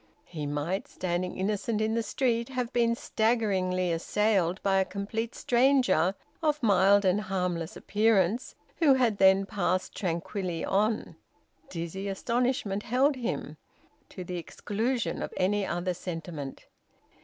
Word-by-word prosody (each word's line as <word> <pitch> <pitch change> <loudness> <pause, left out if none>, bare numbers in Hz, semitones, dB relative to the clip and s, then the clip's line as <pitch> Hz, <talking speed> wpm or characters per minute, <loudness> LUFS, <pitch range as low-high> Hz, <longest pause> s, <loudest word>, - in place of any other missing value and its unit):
He 155 -4 -5
might, 145 +7 -2
standing 180 0 -3
innocent 210 +3 -1
in 220 +1 0
the 230 - +1
street, 235 +1 0
have 250 -2 -3
been 235 -1 +2
staggeringly 195 -7 0
assailed 190 +1 +1
by 195 -1 +3
a - - +4
complete 210 +4 -4
stranger 245 - +3 0.3
of 300 -3 0
mild 200 -1 +5
and 190 +3 +3
harmless 180 -4 -2
appearance, 215 +1 +1 0.2
who 295 -5 +5
had 235 -6 +1
then 190 0 +5
passed 185 -2 -1
tranquilly 175 -1 -3
on. 215 +3 0 0.5
Dizzy 175 +3 -5
astonishment 235 +1 -1
held 265 +6 +2
him, 250 -2 -4 0.5
to 185 - -7
the 180 0 -5
exclusion 225 +8 -2
of - - -4
any 200 +2 +1
other 175 +1 -1
sentiment. 165 -5 -6
200 Hz, 130 wpm, -28 LUFS, 180-230 Hz, 0.5 s, mild